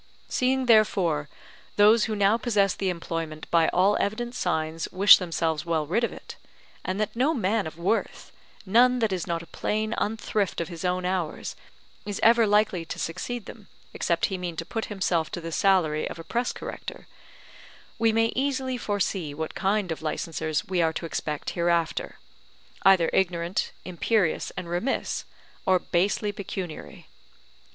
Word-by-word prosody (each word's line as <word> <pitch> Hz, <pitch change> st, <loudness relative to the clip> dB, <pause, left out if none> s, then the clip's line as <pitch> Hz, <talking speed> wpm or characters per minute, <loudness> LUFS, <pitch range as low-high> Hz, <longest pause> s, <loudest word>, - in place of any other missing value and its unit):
Seeing 260 Hz, +1 st, +1 dB
therefore 185 Hz, -, +3 dB, 0.5 s
those 210 Hz, +2 st, +6 dB
who 220 Hz, -, -2 dB
now 200 Hz, +1 st, +4 dB
possess 210 Hz, -5 st, +2 dB
the 195 Hz, -, -2 dB
employment 165 Hz, -3 st, -4 dB
by 165 Hz, -1 st, +4 dB
all 195 Hz, +3 st, +3 dB
evident 235 Hz, +4 st, -2 dB
signs 160 Hz, -6 st, -1 dB
wish 195 Hz, +2 st, +8 dB
themselves 165 Hz, -4 st, -1 dB
well 165 Hz, -3 st, 0 dB
rid 185 Hz, +10 st, 0 dB
of 235 Hz, -, 0 dB
it; -, -, -10 dB, 0.5 s
and 185 Hz, +2 st, -3 dB
that 215 Hz, +1 st, -2 dB
no 275 Hz, +7 st, +2 dB
man 210 Hz, -, 0 dB
of 160 Hz, -, -9 dB
worth, 185 Hz, +7 st, -2 dB, 0.3 s
none 245 Hz, +6 st, +5 dB
that 225 Hz, -5 st, +1 dB
is 180 Hz, -2 st, -3 dB
not 170 Hz, -1 st, -2 dB
a -, -, -11 dB
plain 215 Hz, +5 st, -2 dB
unthrift 210 Hz, -2 st, -1 dB
of 170 Hz, -, -3 dB
his 170 Hz, -1 st, -7 dB
own 180 Hz, 0 st, 0 dB
hours, 180 Hz, -4 st, -2 dB, 0.5 s
is 205 Hz, -1 st, -4 dB
ever 230 Hz, 0 st, +6 dB
likely 205 Hz, -4 st, +2 dB
to 165 Hz, -, -7 dB
succeed 210 Hz, +8 st, -4 dB
them, 215 Hz, -4 st, -11 dB, 0.3 s
except 170 Hz, -1 st, 0 dB
he 190 Hz, -2 st, -3 dB
mean 175 Hz, -2 st, -4 dB
to 165 Hz, -, -4 dB
put 225 Hz, +5 st, -3 dB
himself 180 Hz, -5 st, -1 dB
to -, -, -5 dB
the 165 Hz, 0 st, -6 dB
salary 165 Hz, -5 st, +2 dB
of -, -, -7 dB
a 165 Hz, -, -8 dB
press 240 Hz, +7 st, -1 dB
corrector; -, -, -8 dB, 0.9 s
we 225 Hz, 0 st, +4 dB
may 225 Hz, +1 st, +2 dB
easily 260 Hz, -1 st, -1 dB
foresee 190 Hz, -8 st, -2 dB
what 160 Hz, +1 st, -4 dB
kind 195 Hz, -2 st, 0 dB
of 160 Hz, -, -4 dB
licensers 155 Hz, 0 st, -2 dB
we 185 Hz, -2 st, +1 dB
are 160 Hz, -1 st, +2 dB
to 165 Hz, -, -4 dB
expect 150 Hz, -2 st, -3 dB
hereafter, 170 Hz, -1 st, 0 dB, 0.6 s
either 190 Hz, -3 st, +5 dB
ignorant, 175 Hz, -1 st, 0 dB
imperious, 185 Hz, 0 st, 0 dB
and 180 Hz, -1 st, -4 dB
remiss, 175 Hz, +10 st, -2 dB, 0.4 s
or 185 Hz, -1 st, +5 dB
basely 195 Hz, +4 st, 0 dB
pecuniary. 190 Hz, -4 st, -7 dB
190 Hz, 160 wpm, -26 LUFS, 165-215 Hz, 0.9 s, wish